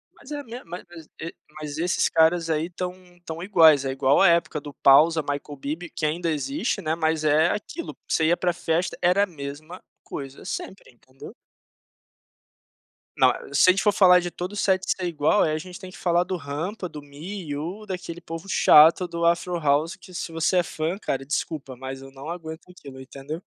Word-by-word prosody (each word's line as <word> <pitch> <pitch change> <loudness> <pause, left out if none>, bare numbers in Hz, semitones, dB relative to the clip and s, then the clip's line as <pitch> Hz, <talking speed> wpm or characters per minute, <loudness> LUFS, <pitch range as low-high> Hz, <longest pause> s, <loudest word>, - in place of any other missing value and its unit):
Mas 285 - -15
é 290 - -3
a - - -7
minha, 240 0 -9
ma 175 +1 -7 0.2
es 160 -2 -11
e 165 +1 -6 0.3
mas 150 -1 -6
esses 175 +3 +1
caras 165 +1 +3
aí 155 0 0
estão 180 0 -5 0.2
estão 165 -2 -8
iguais, 165 -7 +5
é 135 - -1
igual 135 +1 +3
a 195 - +7
época 170 -3 +2
do 145 0 -10
Pawsa 160 +4 +5
Michael 145 0 -5
Bibi, 155 +6 -5
que 155 - -3
ainda 165 +3 -1
existe, 220 - -2
né, 160 -1 -1
mas 160 -1 0
é 155 +2 +4
aquilo, 320 - -5
você 160 - +1
ia 175 +2 +3
para 175 -1 0
festa, 170 +1 -1
era 180 +3 +4
a - - +2
mesma 155 +2 -8 0.2
coisa 135 -1 -8
sempre, 190 -2 -6
entendeu. 130 +2 -14 1.8
Não, - - +6
eh, - - -8
se 145 +6 +6
a 185 - +7
gente 195 - -1
for 210 - +4
falar 185 -3 +6
de 175 -1 -4
todo 180 +3 -6
o - - -7
set 190 -2 +1
ser 185 - 0
igual, 170 +3 +2
aí 155 - +1
a - - 0
gente 180 +3 -9
tem 185 - -10
que - - -13
falar 175 0 +2
do 185 - -3
Rampa, 165 +7 -4
do 150 -3 -9
Me 155 +8 -8
You, 170 +9 -5
daquele 180 -3 -6
povo 165 +2 -8
chato 165 0 +6
do 170 0 -2
Afro 170 +1 +1
House, 150 +4 +1
que 185 -1 -16
se 175 -1 -5
você 165 +3 +1
é 175 - +4
fã, 160 +2 -3
cara, 135 -9 -3
desculpa, 145 -2 -3
mas 130 +1 -7
eu 135 0 -12
não 135 +3 -9
aguento 165 -1 -7
aquilo, 140 -7 -12
entendeu. 140 +5 -8
165 Hz, 210 wpm, -24 LUFS, 150-180 Hz, 1.8 s, a